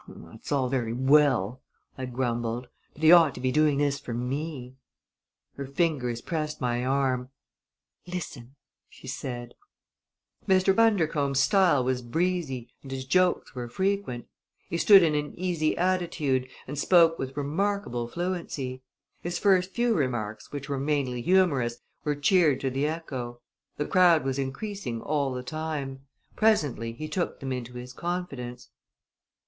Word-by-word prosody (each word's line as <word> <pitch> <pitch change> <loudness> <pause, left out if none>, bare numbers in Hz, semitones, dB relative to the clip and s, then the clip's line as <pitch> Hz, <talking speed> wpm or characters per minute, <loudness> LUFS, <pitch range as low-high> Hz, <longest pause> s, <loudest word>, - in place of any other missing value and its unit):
"That's 110 - -11
all 135 -3 +2
very 125 -3 -1
well," 130 -3 +3 0.3
I 130 -1 -5
grumbled; 120 -1 -2 0.3
"but 150 - -11
he 160 - +8
ought 165 -5 +7
to - - -7
be 130 0 0
doing 150 0 +3
this 145 -1 +1
for 120 - -6
me." 130 +1 -4 0.8
Her 140 -1 -5
fingers 135 -5 0
pressed 155 0 -3
my 120 -1 -1
arm. 130 -1 0 0.8
"Listen!" 140 -8 -6 0.3
she - - -16
said. 120 -2 -5 0.9
Mr. 190 0 +4
Bundercombe's 160 -11 +2
style 175 -3 +4
was 125 0 0
breezy 145 -2 -2
and 135 - -11
his 135 -1 -5
jokes 185 +5 +2
were 125 -2 -5
frequent. 190 -5 -1 0.4
He 170 - -1
stood 195 -1 +8
in 160 -2 +3
an 150 0 -2
easy 170 -4 0
attitude 170 -8 0 0.2
and 140 +2 -5
spoke 165 0 +5
with 135 +1 -5
remarkable 150 -4 -1
fluency. 155 -5 -4 0.4
His 175 0 -3
first 185 -2 +3
few 240 +3 +1
remarks, 120 - -2
which 145 -2 -6
were 140 -1 -2
mainly 135 -4 -1
humorous, 140 -9 +2 0.3
were 150 -1 0
cheered 150 -1 +3
to 135 - -1
the 135 +3 0
echo. 130 -7 -5 0.4
The 150 - -1
crowd 175 -4 +5
was 135 0 -1
increasing 135 - -4
all 140 +1 -1
the 125 0 -4
time. 140 -2 -5 0.3
Presently 145 - +2
he 155 +6 -6
took 170 +3 -2
them 135 -1 -4
into 125 -1 -4
his 125 +1 -8
confidence. 140 -8 -5
140 Hz, 145 wpm, -27 LUFS, 125-170 Hz, 0.9 s, he